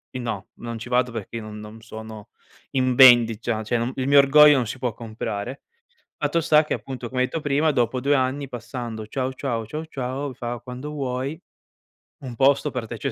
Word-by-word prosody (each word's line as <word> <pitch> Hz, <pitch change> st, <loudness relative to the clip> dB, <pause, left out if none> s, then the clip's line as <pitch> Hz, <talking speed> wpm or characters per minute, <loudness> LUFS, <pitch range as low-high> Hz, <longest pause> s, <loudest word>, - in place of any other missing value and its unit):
i -, -, -2 dB
no, 115 Hz, -6 st, -4 dB
non 115 Hz, -1 st, -7 dB
ci 125 Hz, -, -8 dB
vado 125 Hz, 0 st, +2 dB
perché 115 Hz, 0 st, -7 dB
io 110 Hz, -, -6 dB
non 105 Hz, 0 st, -8 dB
non 105 Hz, +1 st, -11 dB
sono 110 Hz, -2 st, -10 dB, 0.4 s
in 130 Hz, -2 st, +1 dB
vendita, 115 Hz, -3 st, +6 dB
cioè- 120 Hz, +3 st, 0 dB
cioè 120 Hz, +2 st, -1 dB
il 130 Hz, 0 st, -1 dB
mio 140 Hz, 0 st, +5 dB
orgoglio 150 Hz, +1 st, +7 dB
non 125 Hz, -, 0 dB
si 130 Hz, -, -6 dB
può 125 Hz, -2 st, -1 dB
comprare. 110 Hz, +2 st, -5 dB, 0.6 s
Fatto 170 Hz, -, 0 dB
sta 155 Hz, -1 st, +5 dB
che -, -, -2 dB
appunto 125 Hz, -3 st, -7 dB
come 125 Hz, -1 st, -1 dB
hai 130 Hz, -, +2 dB
etto 165 Hz, -, -4 dB
prima, 150 Hz, +2 st, +2 dB
dopo 125 Hz, 0 st, 0 dB
2 145 Hz, +2 st, +3 dB
anni 135 Hz, +2 st, 0 dB
passando: 120 Hz, -2 st, -6 dB
"Ciao 130 Hz, +2 st, -2 dB
ciao." 120 Hz, -4 st, -3 dB
"Ciao 155 Hz, +6 st, -5 dB
ciao." 135 Hz, 0 st, -4 dB
Fa: 120 Hz, -1 st, -5 dB
"Quando 125 Hz, +3 st, -7 dB
vuoi, 135 Hz, +1 st, -3 dB, 0.8 s
un 125 Hz, -2 st, -6 dB
posto 140 Hz, +3 st, +3 dB
per 120 Hz, -4 st, -4 dB
te 115 Hz, -, -6 dB
c'è 135 Hz, +5 st, -3 dB
125 Hz, 205 wpm, -23 LUFS, 115-135 Hz, 0.8 s, orgoglio